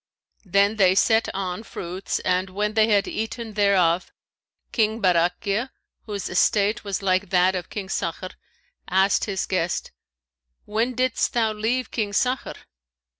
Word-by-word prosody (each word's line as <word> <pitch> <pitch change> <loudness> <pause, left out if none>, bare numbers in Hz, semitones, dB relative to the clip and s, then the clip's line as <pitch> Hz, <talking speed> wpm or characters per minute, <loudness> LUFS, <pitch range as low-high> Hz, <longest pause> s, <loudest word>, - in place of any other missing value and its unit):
Then 200 +3 +2
they 185 -2 +4
set 225 +3 +3
on 190 0 -4
fruits, 185 -3 -5
and 185 +1 0
when 210 +3 -2
they 220 0 +4
had 205 -2 +2
eaten 225 0 -4
thereof, 185 -4 +2 0.6
King 220 -1 +1
Barakhiya, 190 +5 +1 0.4
whose 205 -2 -4
estate 205 +4 +2
was 200 -1 -3
like 185 0 +1
that 185 0 +3
of 180 -2 -4
King 200 -2 -5
Sakhr, 185 0 -3 0.6
asked 190 +1 +3
his 195 -3 -2
guest, 175 -2 -2 0.7
'When 230 +4 -1
didst 255 0 0
thou 225 -2 +1
leave 230 +4 -1
King 210 -3 -2
Sakhr?' 255 +5 0
200 Hz, 135 wpm, -24 LUFS, 185-220 Hz, 0.7 s, they